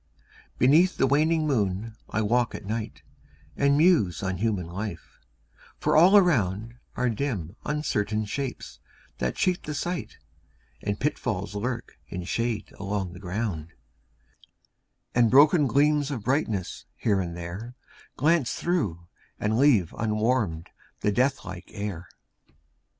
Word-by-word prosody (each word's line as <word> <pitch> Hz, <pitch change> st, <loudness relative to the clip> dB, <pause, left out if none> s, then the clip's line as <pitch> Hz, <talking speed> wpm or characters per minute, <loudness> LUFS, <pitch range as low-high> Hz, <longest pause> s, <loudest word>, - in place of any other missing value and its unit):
Beneath 160 Hz, +9 st, +4 dB
the -, -, +3 dB
waning 155 Hz, +4 st, +2 dB
moon 110 Hz, -5 st, -1 dB
I 110 Hz, -, 0 dB
walk 120 Hz, +2 st, +1 dB
at -, -, -8 dB
night, 110 Hz, +1 st, -4 dB, 0.5 s
And 140 Hz, 0 st, +3 dB
muse 150 Hz, -, +3 dB
on 95 Hz, -1 st, -1 dB
human 105 Hz, -5 st, 0 dB
life 90 Hz, 0 st, -7 dB, 0.6 s
for -, -, +1 dB
all 180 Hz, +6 st, +8 dB
around 115 Hz, -, +2 dB, 0.2 s
Are 125 Hz, -, +1 dB
dim 110 Hz, -, -2 dB
uncertain 110 Hz, -8 st, -1 dB
shapes 130 Hz, +5 st, -5 dB, 0.4 s
that 65 Hz, 0 st, -1 dB
cheat 180 Hz, -1 st, +1 dB
the 150 Hz, -, -5 dB
sight, 175 Hz, +4 st, -4 dB, 0.6 s
And 100 Hz, 0 st, -2 dB
pitfalls 105 Hz, -9 st, -2 dB
lurk 120 Hz, +4 st, -4 dB
in 90 Hz, -, -5 dB
shade 115 Hz, +4 st, -2 dB
along 100 Hz, -2 st, -3 dB
the 90 Hz, -, -10 dB
ground, 90 Hz, -4 st, -4 dB, 1.4 s
And 120 Hz, -2 st, +4 dB
broken 145 Hz, +3 st, +6 dB
gleams 145 Hz, +1 st, +3 dB
of 130 Hz, -7 st, -4 dB
brightness, 110 Hz, -, -1 dB
here 100 Hz, -3 st, +1 dB
and 85 Hz, -2 st, -5 dB
there, 95 Hz, +9 st, -7 dB, 0.4 s
Glance 155 Hz, -3 st, +2 dB
through, 105 Hz, -, -1 dB, 0.3 s
and 105 Hz, +1 st, 0 dB
leave 120 Hz, -, +4 dB
unwarmed 110 Hz, -6 st, 0 dB, 0.3 s
the 105 Hz, -, +2 dB
death 130 Hz, +6 st, +1 dB
like 95 Hz, -1 st, -7 dB
air. 100 Hz, -4 st, -5 dB
110 Hz, 130 wpm, -26 LUFS, 100-140 Hz, 1.4 s, all